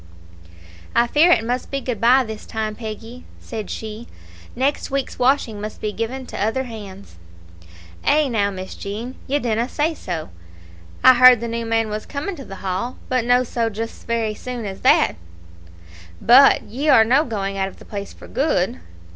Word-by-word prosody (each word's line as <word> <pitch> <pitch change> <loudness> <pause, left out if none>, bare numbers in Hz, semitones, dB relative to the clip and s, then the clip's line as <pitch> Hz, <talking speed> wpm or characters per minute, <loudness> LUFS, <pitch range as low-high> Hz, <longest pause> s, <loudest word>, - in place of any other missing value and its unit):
"I 235 - +5
fear 300 +8 +4
it 225 -6 +4
must 245 +2 -2
be 275 - -2
good 250 -5 -4
bye 255 +3 +5
this 220 -2 -8
time, 220 -1 -3
Peggy," 225 +2 -8 0.2
said 220 -4 -7
she; 220 +1 -6 0.5
"next 275 +3 0
week's 275 -2 -3
washing 245 -5 +1
must 215 +1 -6
be 210 - -2
given 235 +5 -4
to 205 - -4
other 225 +5 0
hands." 200 - -10 0.9
"Eh, 300 0 +3
now, 210 -5 +1
Miss 190 -1 -7
Jean, 220 +6 -6
ye 280 +2 +1
dinna 235 -2 -1
say 310 +3 0
so. 170 - -6 0.7
I 260 - +9
heard 255 -1 +8
the 235 - -4
new 230 0 -3
man 225 -1 0
was 215 0 -5
coming 300 +7 -4
to 275 - -9
the 195 - -9
Hall, 195 +7 -2
but 255 -2 +1
no 245 +1 +4
just 230 -2 -3
so - - -20
very 230 -2 0
soon 245 +1 -6
as 190 -1 -6
that. - - +4 1.0
But 260 +4 +6
ye 275 +8 -3
are 225 -5 +7
no 260 +6 +4
going 195 -6 -3
out 190 - +1
of 195 - -11
the - - -15
place 200 -1 -6
for - - -14
good?" 195 - 0
230 Hz, 180 wpm, -21 LUFS, 215-255 Hz, 1.0 s, I